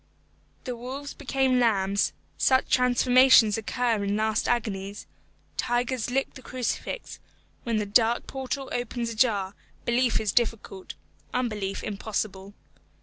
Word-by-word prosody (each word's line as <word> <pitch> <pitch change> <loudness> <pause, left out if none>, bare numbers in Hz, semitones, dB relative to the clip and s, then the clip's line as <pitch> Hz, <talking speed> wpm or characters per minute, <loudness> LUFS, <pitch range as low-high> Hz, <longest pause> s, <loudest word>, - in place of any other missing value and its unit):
The 250 -2 -4
wolves 265 +4 -6
became 265 -2 +1
lambs 200 -4 +2 0.2
such 260 0 +2
transformations 250 -3 +5
occur 225 -1 0
in 200 +1 0
last 220 0 0
agonies; 205 -4 -2 0.5
tigers 245 0 -1
lick 270 +2 -1
the 265 - -11
crucifix; 255 - -4 0.5
when 230 -2 0
the 210 - 0
dark 230 +3 +3
portal 265 0 -4
opens 240 -1 -2
ajar, 210 -5 +1 0.3
belief 240 0 +2
is 215 - 0
difficult, 225 -5 -1 0.4
unbelief 210 -6 -2
impossible. 200 -1 -4
235 Hz, 115 wpm, -26 LUFS, 210-255 Hz, 0.5 s, transformations